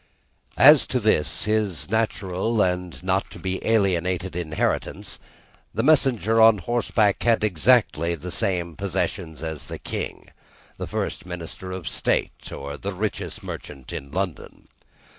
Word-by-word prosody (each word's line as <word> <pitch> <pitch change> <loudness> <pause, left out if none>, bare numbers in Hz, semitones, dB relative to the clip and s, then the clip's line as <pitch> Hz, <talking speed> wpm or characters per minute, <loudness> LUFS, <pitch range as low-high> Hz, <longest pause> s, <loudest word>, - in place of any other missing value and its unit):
As 145 +1 +8
to 125 - 0
this, 105 -9 +1
his 105 -7 0
natural 110 -1 0
and 90 -1 -2
not 95 +1 0
to - - -11
be 95 0 -3
alienated 95 -4 +1
inheritance, 80 -3 -2 0.6
the - - 0
messenger 125 -7 +3
on 110 -1 +7
horseback 110 0 +1
had 115 -2 +3
exactly 90 -4 +3
the 85 +3 -7
same 90 -6 -1
possessions 80 -4 -3
as 80 -2 -5
the - - -6
King, - - -5 0.5
the - - -4
first - - -3
Minister 90 +1 -6
of 95 -3 -6
State, - - -1
or 70 +1 -6
the 100 0 -4
richest 105 +3 -4
merchant 65 -3 -8
in 70 - -6
London. 90 +2 -5
95 Hz, 135 wpm, -24 LUFS, 85-110 Hz, 0.6 s, As